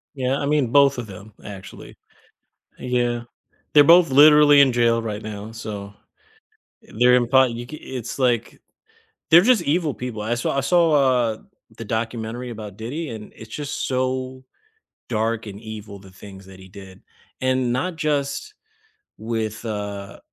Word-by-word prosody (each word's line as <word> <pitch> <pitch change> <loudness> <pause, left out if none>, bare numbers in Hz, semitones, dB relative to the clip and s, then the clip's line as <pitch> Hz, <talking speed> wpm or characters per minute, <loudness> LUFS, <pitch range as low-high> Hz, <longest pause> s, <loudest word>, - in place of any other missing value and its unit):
Yeah, 130 0 -1
I - - -2
mean 145 -2 +1
both 140 0 +4
of 120 -2 -5
them 100 +2 -12
actually. 100 -2 -11 0.8
Yeah, 120 -1 -1 0.5
they're 145 -1 +7
both 170 +1 +6
literally 145 +1 +7
in 135 -3 +5
jail 115 -1 +2
right 105 -1 -5
now, 105 0 -7
so, 105 -3 -7 0.9
uh, - - -17
they're 125 0 +6
in 120 -1 +2
part 130 0 +4
you 120 +1 -6
ca 155 +5 -9
it's, 125 -2 -7
like 120 -3 0 0.7
They're 170 +2 +9
just 225 -2 +3
evil 155 0 0
people, 125 -4 -6
I 110 +3 -1
saw 120 +3 -2
I 140 - +2
saw, 170 +3 +3
uh, 125 -6 +2 0.4
the - - -7
documentary 115 +2 -4
about 105 -3 -9
Diddy, 140 +9 -5
and 110 -2 -9
it's 110 0 -12
just 145 -1 -4
so 130 0 -2 0.7
dark 115 0 -1
and 100 0 -9
evil, 110 -2 -9
the 95 -1 -16
things 95 +1 -13
that 95 -1 -14
he 95 0 -14
did, 95 -1 -13 0.4
and 130 -1 0
not 150 +8 -2
just 150 - -2 0.6
with, 110 0 -4
uh, 100 -2 -6
120 Hz, 160 wpm, -22 LUFS, 110-140 Hz, 0.9 s, They're